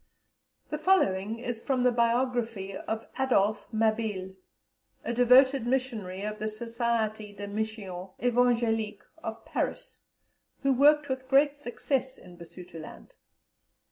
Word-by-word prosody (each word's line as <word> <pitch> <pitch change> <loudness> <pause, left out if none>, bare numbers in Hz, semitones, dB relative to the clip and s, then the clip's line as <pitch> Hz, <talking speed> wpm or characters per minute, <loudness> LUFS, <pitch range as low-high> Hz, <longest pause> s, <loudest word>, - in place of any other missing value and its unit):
The 300 - -2
following 225 - +2
is 235 -1 -5
from 260 -1 0
the 250 - +5
Biography 235 -4 0
of 220 +3 -4
Adolphe 215 -5 +2
Mabille, 215 -4 0 0.7
a 235 - -2
devoted 250 +1 +5
missionary 225 -8 -2
of 210 0 -4
the 215 - -3
Société 220 -2 -2
des 205 - -5
Missions 200 -3 -4
Evangéliques 230 -3 +1 0.2
of 225 0 -6
Paris, - - -3 0.6
who 275 0 +4
worked 295 +3 +5
with 260 -1 -4
great 280 +1 +4
success 260 0 -2
in 180 -1 -14
Basutoland. 170 -1 -11
230 Hz, 115 wpm, -28 LUFS, 210-255 Hz, 0.7 s, the